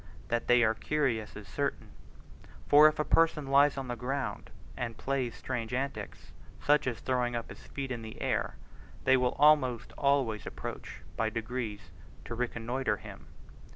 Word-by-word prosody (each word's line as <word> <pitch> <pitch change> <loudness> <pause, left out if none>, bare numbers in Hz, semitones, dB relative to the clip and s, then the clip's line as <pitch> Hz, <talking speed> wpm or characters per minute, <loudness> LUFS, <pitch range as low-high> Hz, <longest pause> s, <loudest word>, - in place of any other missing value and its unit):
That 120 0 -1
they 120 0 +6
are 110 -1 +4
curious 125 -5 -1
is 105 -1 -9
certain; 80 - -3 0.8
for 150 +1 +8
if 155 - +1
a 150 - +1
person 165 -3 +3
lies 140 +1 +4
on 135 -1 -4
the 120 - -3
ground, 135 +4 -3 0.3
and 115 -2 -4
plays 130 -3 -2
strange 125 -2 -3
antics, 135 +2 -4 0.3
such 145 -2 +3
as 120 -3 -2
throwing 125 -2 0
up 115 - -4
his - - -12
feet 135 -1 -5
in 120 -2 -3
the 110 -1 -9
air, - - -1 0.5
they 130 - +5
will 125 -1 +1
almost 140 -5 +4
always 140 -6 +1
approach - - -7
by 110 - +1
degrees 110 -4 -4 0.3
to - - -5
reconnoitre 120 -1 -1
him. - - -11
125 Hz, 160 wpm, -30 LUFS, 115-140 Hz, 0.8 s, for